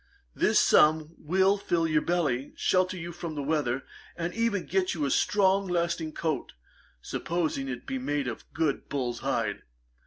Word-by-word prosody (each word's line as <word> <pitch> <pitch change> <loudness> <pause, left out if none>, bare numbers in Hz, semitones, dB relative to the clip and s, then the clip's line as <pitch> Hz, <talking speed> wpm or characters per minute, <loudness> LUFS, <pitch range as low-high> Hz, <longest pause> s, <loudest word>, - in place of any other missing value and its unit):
This - - +3
sum 155 +1 +4
will 190 +5 +2
fill 170 -4 0
your 155 -1 +2
belly, 150 -7 0
shelter 185 0 +1
you 170 0 -6
from 170 -2 -6
the 145 - -3
weather, 140 -4 0 0.3
and 170 0 -3
even 230 -4 0
get 190 -1 0
you 150 -3 -1
a 140 - 0
strong 195 -1 +3
lasting 170 -2 -1
coat, 155 -6 -2 0.5
supposing 160 -5 -2
it 125 -1 -4
to - - -32
be 135 - -3
made 140 +1 -1
of 120 - -7
good 155 -3 -1
bull's 125 -4 -2
hide. - - -1
160 Hz, 165 wpm, -28 LUFS, 145-180 Hz, 0.5 s, sum